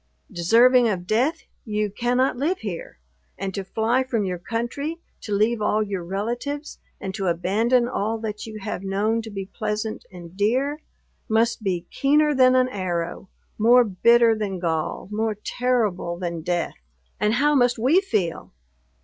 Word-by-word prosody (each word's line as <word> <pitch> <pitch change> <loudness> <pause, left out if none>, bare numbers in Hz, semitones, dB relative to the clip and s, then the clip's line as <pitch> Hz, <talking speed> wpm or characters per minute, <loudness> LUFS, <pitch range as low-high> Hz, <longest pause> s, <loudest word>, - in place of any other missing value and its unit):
Deserving 235 +7 +5
of 180 -4 -2
death, 245 - +1 0.2
you 210 -2 -2
cannot 245 +5 +1
live 310 +9 0
here; 190 - -6 0.4
and 195 -1 -4
to 195 - -3
fly 225 +6 +1
from 235 -5 -1
your 180 -2 -3
country, 240 - -3 0.2
to 210 - -7
leave 215 +3 +2
all 215 +1 +2
your 195 -4 -4
relatives, 240 - -4 0.2
and 190 -1 -5
to 195 -2 -2
abandon 215 +9 +2
all 220 -1 -1
that 220 -1 -5
you 215 -1 -7
have 200 -2 -4
known 205 +4 0
to 225 - -8
be 195 -2 -5
pleasant 215 +1 -4
and 175 -1 -11
dear, 260 +9 0 0.5
must 225 +1 +2
be 180 -4 -2
keener 295 +2 +3
than 255 -1 +5
an 255 0 +4
arrow, 180 -3 -3 0.3
more 240 +3 +6
bitter 230 +3 +4
than 205 -3 -3
gall, 165 -2 -2
more 215 0 -1
terrible 210 -6 -1
than 170 -2 -4
death! 175 +1 -1 0.5
And 210 +2 +2
how 295 +3 +3
must 245 -3 +3
we 270 +12 +4
feel? 200 - -2
215 Hz, 160 wpm, -23 LUFS, 190-245 Hz, 0.5 s, more